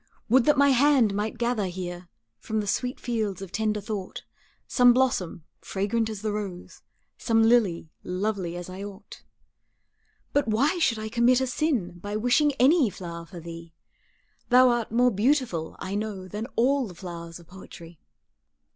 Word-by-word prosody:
Would 250 +2 +5
that 295 - +4
my 280 0 +5
hand 265 -5 +4
might 210 +3 -2
gather 235 -4 0
here 175 -1 -6 0.3
From 220 - -3
the 210 - -2
sweet 250 +5 -2
fields 215 -6 -2
of 195 -2 -8
tender 215 0 -1
thought, 200 -2 -6 0.4
Some 245 -1 +5
blossom, 230 -10 0 0.2
fragrant 220 +3 -1
as 215 -1 -7
the 215 - -1
rose, 200 -4 -6 0.4
Some 225 -1 +2
lily, 210 -9 +2
lovely 185 -2 -2
as 175 0 -6
I 185 +2 -7
ought. 200 0 -10 1.1
But 285 -2 +2
why 265 +11 +1
should 245 -9 +2
I 215 0 -5
commit 240 +3 +3
a 260 - 0
sin 245 - -1
By 205 +3 -5
wishing 245 +7 +3
any 270 0 +4
flower 170 -3 -8
for 180 -1 -10
thee; 165 0 -10 0.7
Thou 255 +1 +6
art 240 -3 -1
more 245 +2 +3
beautiful, 220 - 0
I 190 - -6
know, 205 -3 -4
Than 210 +5 -5
all 265 +1 +2
the 180 - -11
flowers 170 -1 -8
of 170 - -16
poetry. 170 -2 -13
215 Hz, 165 wpm, -26 LUFS, 185-245 Hz, 1.1 s, Thou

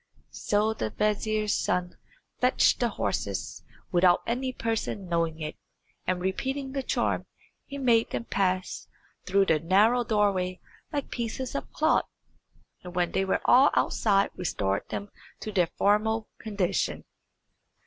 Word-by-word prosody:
So 210 +1 +1
the 110 - -3
vizier's 215 - 0
son 180 0 -1 0.4
fetched 250 +1 +3
the 240 - +2
horses - - -3 0.3
without 175 0 +4
any 255 +2 -1
person 225 -5 -3
knowing 165 -2 0
it, 155 0 -5 0.5
and 185 0 +1
repeating 265 +9 -2
the 275 0 -2
charm, - - -1 0.4
he 280 - -6
made 235 -4 +3
them 235 - -3
pass 185 -3 -1 0.4
through 195 +1 +4
the 160 -4 +3
narrow 210 +9 +4
doorway 200 -5 +1 0.3
like 285 -3 -3
pieces 240 +2 -3
of 280 - -4
cloth, 315 - +2 0.7
and 180 0 -9
when 175 -1 +1
they 195 - +1
were 190 - 0
all 265 +3 +7
outside 200 -2 +2
restored 100 - -2
them 205 0 -5 0.3
to 215 - -4
their 180 -5 +2
former 215 +2 +2 0.2
condition. 205 -5 -1
205 Hz, 135 wpm, -27 LUFS, 180-235 Hz, 0.7 s, all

